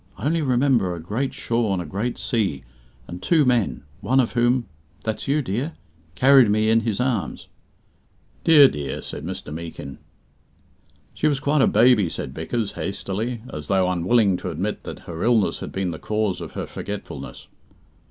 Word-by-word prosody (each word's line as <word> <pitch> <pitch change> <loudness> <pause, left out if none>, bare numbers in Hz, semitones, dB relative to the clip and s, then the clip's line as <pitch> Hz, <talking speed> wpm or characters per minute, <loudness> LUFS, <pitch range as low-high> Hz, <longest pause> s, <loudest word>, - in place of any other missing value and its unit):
I 105 - -6
only 165 +2 +1
remember 125 - +2
a - - -7
great 110 +11 -2
shore 115 -3 -1
and 95 - -1
a 90 - -4
great 100 +10 -3
sea, 105 - -1 0.4
and 90 +1 -8
two 155 - +3
men, 120 -4 +1 0.2
one 130 +1 +2
of 125 - +2
whom 120 0 +2 0.4
that's 110 +3 -3
you, 145 +2 +1
dear 125 - -2 0.4
carried 130 +2 +6
me 110 +1 +3
in 115 - +5
his 110 -3 -2
arms." 125 -5 -2 1.0
"Dear, 150 -4 +8
dear," 70 - -4
said - - -7
Mr. 75 - -6
Meekin. 80 -4 -7 1.1
"She 155 - 0
was 145 -3 +1
quite 145 +1 +2
a - - +5
baby," 115 -7 +4
said 65 - -5
Vickers, 100 - -2
hastily, 110 +4 -4
as 75 -1 -6
though 95 -2 +2
unwilling 95 +3 +2
to 90 - -5
admit 90 +6 -3
that - - -7
her 85 -1 -7
illness 115 -4 +2
had - - -6
been 95 -2 -2
the 80 - -7
cause 105 -3 -1
of - - -7
her - - -4
forgetfulness. 105 -1 -7
110 Hz, 170 wpm, -23 LUFS, 95-125 Hz, 1.1 s, Dear